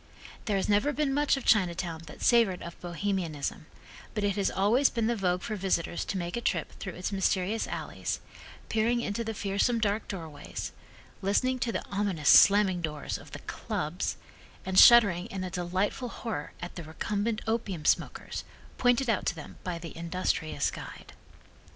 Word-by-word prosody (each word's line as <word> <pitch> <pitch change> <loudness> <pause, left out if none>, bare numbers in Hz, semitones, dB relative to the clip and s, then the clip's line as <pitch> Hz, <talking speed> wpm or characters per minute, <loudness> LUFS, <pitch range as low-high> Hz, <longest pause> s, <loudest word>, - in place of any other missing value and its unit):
There 205 -3 +1
has 195 - -1
never 210 +8 +3
been 285 -1 0
much 290 0 +2
of 270 - -6
Chinatown 180 -5 +2
that 150 - -9
savored 230 -7 +4
of 170 - -9
Bohemianism, 175 -4 -3 0.5
but 210 - -1
it 200 -1 +1
has 200 -2 +1
always 230 +8 +3
been 230 -2 -1
the 235 +1 +1
vogue 180 -3 0
for 215 - -3
visitors 185 -3 -1
to 195 - -3
make 175 -1 -3
a 235 - -2
trip - - -1
through 190 -4 -5
its 180 - -3
mysterious 195 +2 0
alleys, - - -4 0.5
peering 230 +2 +1
into 220 +1 -2
the 225 -1 -4
fearsome 200 +4 +1
dark 215 -1 0
doorways, 160 -6 -6 0.5
listening 255 +7 +1
to 235 - 0
the - - -3
ominous 195 -7 0
slamming 195 -3 +7
doors 150 -3 -3
of - - -13
the - - -7
"clubs," 155 +4 -3 0.5
and 190 0 +4
shuddering 205 -6 +8
in 195 -5 -5
a 185 - -4
delightful 185 +8 -1
horror 220 -11 -5
at 175 - -6
the 175 - -7
recumbent 205 +7 -2
opium 215 -8 -2
smokers, - - 0 0.4
pointed 245 +1 +3
out 225 -4 +1
to - - +1
them 150 - -10
by 180 -2 -3
the 170 -1 -8
industrious 170 -1 -1
guide. - - -9
195 Hz, 170 wpm, -29 LUFS, 175-225 Hz, 0.5 s, shuddering